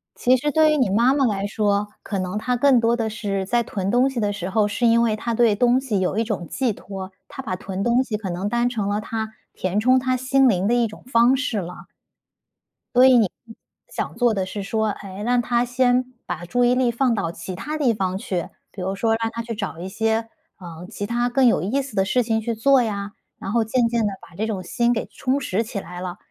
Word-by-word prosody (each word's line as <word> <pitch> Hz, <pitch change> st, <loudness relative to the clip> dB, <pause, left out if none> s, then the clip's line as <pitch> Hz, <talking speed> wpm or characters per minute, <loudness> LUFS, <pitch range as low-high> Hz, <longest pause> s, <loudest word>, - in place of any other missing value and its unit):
其 255 Hz, +1 st, +3 dB
实 295 Hz, +4 st, -1 dB
对 315 Hz, 0 st, +4 dB
于 305 Hz, -, +2 dB
你 255 Hz, -8 st, +2 dB
妈 235 Hz, +7 st, +4 dB
妈 280 Hz, -2 st, +2 dB
来 200 Hz, -4 st, 0 dB
说， 205 Hz, -1 st, 0 dB
可 200 Hz, -, -4 dB
能 185 Hz, +3 st, -3 dB
她 250 Hz, +3 st, 0 dB
更 260 Hz, 0 st, +4 dB
多 230 Hz, +1 st, +2 dB
地 225 Hz, -2 st, -1 dB
是 200 Hz, -3 st, -3 dB
在 240 Hz, +4 st, +1 dB
囤 195 Hz, -2 st, -3 dB
东 250 Hz, +3 st, +3 dB
西 255 Hz, -3 st, -4 dB
的 205 Hz, -1 st, 0 dB
时 190 Hz, -2 st, -4 dB
候， 210 Hz, 0 st, +2 dB
是 210 Hz, +4 st, -1 dB
因 230 Hz, +1 st, +4 dB
为 225 Hz, -2 st, +2 dB
她 235 Hz, +2 st, -3 dB
对 225 Hz, -2 st, +3 dB
东 245 Hz, +3 st, +3 dB
西 230 Hz, -7 st, -1 dB
有 185 Hz, +3 st, -1 dB
一 225 Hz, -, +2 dB
种 205 Hz, -6 st, -4 dB
寄 250 Hz, -5 st, 0 dB
托， 190 Hz, -1 st, -8 dB, 0.2 s
她 270 Hz, -, -8 dB
把 185 Hz, -6 st, -3 dB
囤 190 Hz, +1 st, -5 dB
东 240 Hz, +3 st, +3 dB
西 220 Hz, -5 st, -3 dB
可 200 Hz, -3 st, -5 dB
能 185 Hz, +4 st, -2 dB
当 240 Hz, +1 st, +1 dB
成 215 Hz, -5 st, -2 dB
了 205 Hz, +1 st, 0 dB
她 220 Hz, 0 st, -4 dB, 0.2 s
填 185 Hz, +3 st, -1 dB
充 255 Hz, +3 st, +4 dB
她 255 Hz, 0 st, 0 dB
心 265 Hz, +1 st, +3 dB
灵 190 Hz, -1 st, +1 dB
的 240 Hz, -, +2 dB
一 240 Hz, -1 st, +3 dB
种 210 Hz, -, -13 dB
方 240 Hz, +2 st, +5 dB
式 245 Hz, -7 st, -1 dB
了。 180 Hz, 0 st, -8 dB, 1.1 s
所 250 Hz, +1 st, +7 dB
以 255 Hz, -2 st, +7 dB
你 210 Hz, -6 st, +3 dB, 0.6 s
想 -, -, -4 dB
做 240 Hz, -2 st, +2 dB
的 190 Hz, -2 st, -1 dB
是 200 Hz, +1 st, -5 dB
说， 220 Hz, +2 st, 0 dB
哎， 195 Hz, -1 st, -7 dB
让 245 Hz, +1 st, +2 dB
她 240 Hz, +1 st, +1 dB
先 250 Hz, +1 st, +1 dB
把 175 Hz, 0 st, -5 dB
注 245 Hz, +6 st, +1 dB
意 245 Hz, -, +3 dB
力 250 Hz, -2 st, +2 dB
放 245 Hz, 0 st, +1 dB
到 195 Hz, -6 st, -1 dB
其 180 Hz, +2 st, -7 dB
它 300 Hz, +11 st, -4 dB
地 265 Hz, -6 st, +2 dB
方 190 Hz, -3 st, -2 dB
去， 185 Hz, -3 st, -3 dB, 0.2 s
比 190 Hz, -, -8 dB
如 190 Hz, +2 st, -2 dB
说 225 Hz, +2 st, +1 dB
让 225 Hz, 0 st, -1 dB
她 230 Hz, -, -4 dB
去 230 Hz, 0 st, -5 dB
找 195 Hz, -6 st, -5 dB
一 185 Hz, -, -5 dB
些， 225 Hz, +2 st, -1 dB, 0.3 s
嗯， 175 Hz, 0 st, -9 dB
其 205 Hz, -, -5 dB
它 240 Hz, +3 st, 0 dB
更 260 Hz, +1 st, +3 dB
有 230 Hz, -, +4 dB
意 240 Hz, +11 st, 0 dB
思 265 Hz, -5 st, -9 dB
的 190 Hz, -, +2 dB
事 250 Hz, +5 st, +2 dB
情 220 Hz, -1 st, 0 dB
去 230 Hz, +1 st, -2 dB
做 265 Hz, +4 st, +4 dB
呀， 205 Hz, -2 st, -3 dB, 0.3 s
然 195 Hz, -, -5 dB
后 230 Hz, -1 st, +2 dB
渐 230 Hz, +2 st, +1 dB
渐 235 Hz, 0 st, 0 dB
地 205 Hz, -, -1 dB
把 170 Hz, -, -18 dB
这 220 Hz, +3 st, -2 dB
种 195 Hz, -4 st, -3 dB
心 235 Hz, +6 st, +1 dB
给 225 Hz, -, -2 dB
充 260 Hz, +2 st, -1 dB
实 225 Hz, -4 st, -1 dB
起 220 Hz, -2 st, -5 dB
来 180 Hz, -1 st, -8 dB
了， 180 Hz, 0 st, -5 dB
225 Hz, 265 characters per minute, -22 LUFS, 200-245 Hz, 1.1 s, 所